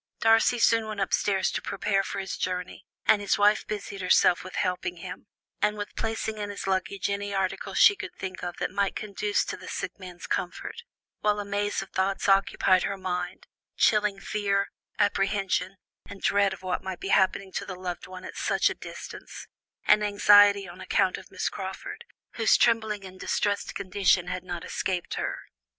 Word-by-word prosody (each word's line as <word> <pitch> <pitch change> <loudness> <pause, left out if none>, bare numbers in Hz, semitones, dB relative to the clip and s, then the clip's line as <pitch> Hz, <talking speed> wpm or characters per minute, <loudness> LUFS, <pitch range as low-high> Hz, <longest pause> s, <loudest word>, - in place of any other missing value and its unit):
Darcy 225 +2 +4
soon 225 -1 +3
went 215 -1 -5
upstairs 195 0 +1
to - - -2
prepare 195 -2 0
for 195 - -5
his 195 -1 -3
journey, 180 0 -4 0.2
and 205 - +5
his 200 - +1
wife 210 +1 +3
busied 200 -2 -5
herself 180 -1 +4
with 185 - -9
helping 180 -1 -1
him, 170 - -8 0.3
and 210 0 +2
with 205 0 -6
placing 220 -1 -2
in 205 0 -3
his 205 - -6
luggage 190 +1 -1
any 200 0 -2
article 190 -1 -2
she 405 - +7
could - - -7
think 185 -1 -6
of 175 -1 -4
that - - -2
might 200 -1 0
conduce 210 0 -1
to - - -4
the - - -12
sick - - -5
man's 180 -2 -9
comfort, 315 - -3 0.4
while 210 0 +1
a 205 - -3
maze 205 0 -1
of 195 - -16
thoughts 195 +2 0
occupied 195 -1 +4
her 200 +1 -2
mind, 180 -1 -4 0.3
chilling 210 -2 +3
fear, 200 -2 -1 0.3
apprehension, 195 -2 +1 0.3
and 200 - -10
dread 200 -1 +3
of 190 - -8
what 185 -1 -1
might 190 -2 -5
be 195 - -5
happening 190 0 +2
to - - -3
the 185 - -6
loved 180 -1 -5
friend 185 0 -9
at - - -8
such - - +2
a - - -2
distance, - - -9 0.4
and 210 0 +5
anxiety 205 -1 +6
on 175 +2 -11
account 185 - +1
of - - -15
Miss - - -2
Crawford, 390 - -6 0.3
whose 225 -1 +5
trembling 220 -4 +2
and 185 0 -11
distressed 205 +1 -1
condition 185 -2 +2
had 180 0 -4
not 175 -2 -6
escaped 180 -2 -2
her. - - -2
195 Hz, 185 wpm, -27 LUFS, 185-205 Hz, 0.4 s, she